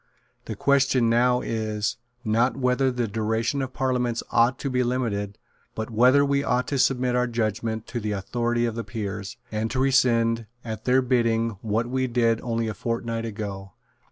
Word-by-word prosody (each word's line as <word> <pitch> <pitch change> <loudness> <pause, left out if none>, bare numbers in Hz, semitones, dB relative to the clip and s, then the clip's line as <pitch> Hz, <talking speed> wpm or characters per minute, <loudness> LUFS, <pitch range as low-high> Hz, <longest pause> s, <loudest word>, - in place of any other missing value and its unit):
The - - -5
question 135 -4 +3
now 125 +1 +3
is, 110 -1 -2 0.3
not 115 +4 +2
whether 130 0 +2
the 125 -2 -1
duration 110 +5 -1
of 130 -1 -3
parliaments 125 -3 -1
ought 120 +2 +3
to 140 - -3
be 125 0 +1
limited, 110 -5 -2 0.4
but 110 +1 -4
whether 130 +5 +5
we 140 0 +1
ought 125 -2 0
to 140 - -1
submit 125 -1 +2
our 125 0 +2
judgment 110 -1 -2
to 120 - -3
the 105 -1 -2
authority 120 +4 -1
of 115 - -1
the 115 +1 -4
Peers, 100 -3 -5
and 110 +1 -1
to 130 - -2
rescind, 115 -4 +2 0.2
at 110 -2 -6
their 130 +1 +4
bidding, 115 -2 +1
what 110 +1 0
we 130 +1 0
did 115 -2 +1
only 115 -1 -1
a 110 - -2
fortnight 115 +2 -3
ago. 100 -3 -6
115 Hz, 175 wpm, -25 LUFS, 110-125 Hz, 0.4 s, whether